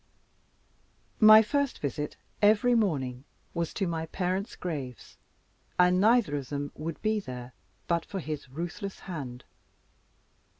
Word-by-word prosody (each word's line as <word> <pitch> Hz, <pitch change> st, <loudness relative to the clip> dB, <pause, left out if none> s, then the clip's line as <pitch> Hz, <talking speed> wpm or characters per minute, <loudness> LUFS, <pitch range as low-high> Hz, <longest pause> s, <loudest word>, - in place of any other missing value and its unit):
My 215 Hz, 0 st, +9 dB
first 280 Hz, +4 st, 0 dB
visit, 150 Hz, +1 st, -3 dB, 0.3 s
every 215 Hz, +4 st, +5 dB
morning, 135 Hz, -, 0 dB, 0.3 s
was 170 Hz, -1 st, -2 dB
to 195 Hz, -, 0 dB
my 165 Hz, -2 st, -2 dB
parents' 185 Hz, +4 st, -2 dB
graves, 140 Hz, -, -6 dB, 0.6 s
and 180 Hz, +1 st, +5 dB
neither 220 Hz, -7 st, +4 dB
of 135 Hz, -2 st, -6 dB
them 145 Hz, 0 st, -3 dB
would 155 Hz, 0 st, -5 dB
be 215 Hz, 0 st, +2 dB
there 125 Hz, -8 st, -8 dB, 0.3 s
but 170 Hz, -1 st, +1 dB
for 195 Hz, -, -5 dB
his 150 Hz, -5 st, -5 dB
ruthless 175 Hz, +7 st, -5 dB
hand. 135 Hz, -9 st, -6 dB
170 Hz, 125 wpm, -29 LUFS, 145-205 Hz, 0.6 s, My